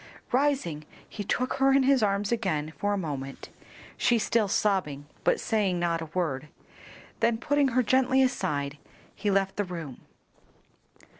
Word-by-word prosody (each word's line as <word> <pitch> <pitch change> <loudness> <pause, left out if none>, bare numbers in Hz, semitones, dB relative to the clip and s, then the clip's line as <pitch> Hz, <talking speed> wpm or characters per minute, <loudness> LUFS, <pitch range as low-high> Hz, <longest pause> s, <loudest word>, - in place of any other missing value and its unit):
Rising, 255 - +1 0.2
he 205 - -6
took 255 +5 -1
her 270 0 +5
in 270 0 +4
his 270 -1 +4
arms 200 0 +1
again 160 -10 -1
for 205 - -1
a - - 0
moment, 140 -6 -5 0.5
she 240 - +3
still 225 -1 +1
sobbing, 185 -9 0 0.2
but - - +2
saying 200 -5 0
not 170 -1 0
a 160 - -5
word, 150 -6 -1 0.7
then 230 -1 +2
putting 285 +4 +2
her 255 - +5
gently 260 +2 +3
aside, 145 - -1 0.3
he 210 - -2
left 195 -1 +1
the 205 - +1
room. 165 -8 -7
200 Hz, 150 wpm, -27 LUFS, 160-245 Hz, 0.7 s, her